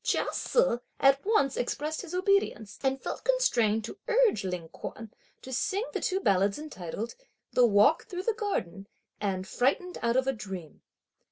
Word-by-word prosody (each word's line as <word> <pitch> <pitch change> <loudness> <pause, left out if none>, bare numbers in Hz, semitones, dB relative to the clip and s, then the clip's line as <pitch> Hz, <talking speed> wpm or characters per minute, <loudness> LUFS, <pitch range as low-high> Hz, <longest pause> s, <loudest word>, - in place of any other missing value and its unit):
Chia - - +1
Se - - +2 0.2
at 275 0 +5
once 400 - +2
expressed 300 +5 -2
his 360 -1 -7
obedience, 370 - +1
and 270 0 0
felt - - -5
constrained 235 - +2
to 390 - -9
urge 475 - +3
Ling 180 -3 -4
Kuan 225 +5 -8 0.3
to 260 - -7
sing 410 - 0
the - - -2
two 380 -2 0
ballads 200 - +2
entitled: 225 - -6 0.4
"The 245 -1 +6
walk 210 +8 +4
through 365 0 -5
the 460 - +1
garden" 200 - -3 0.3
and 190 -2 -2
"Frightened 280 - 0
out 235 +1 +2
of 260 - +2
a 270 - +1
dream." 190 - -8
260 Hz, 165 wpm, -29 LUFS, -, 0.4 s, The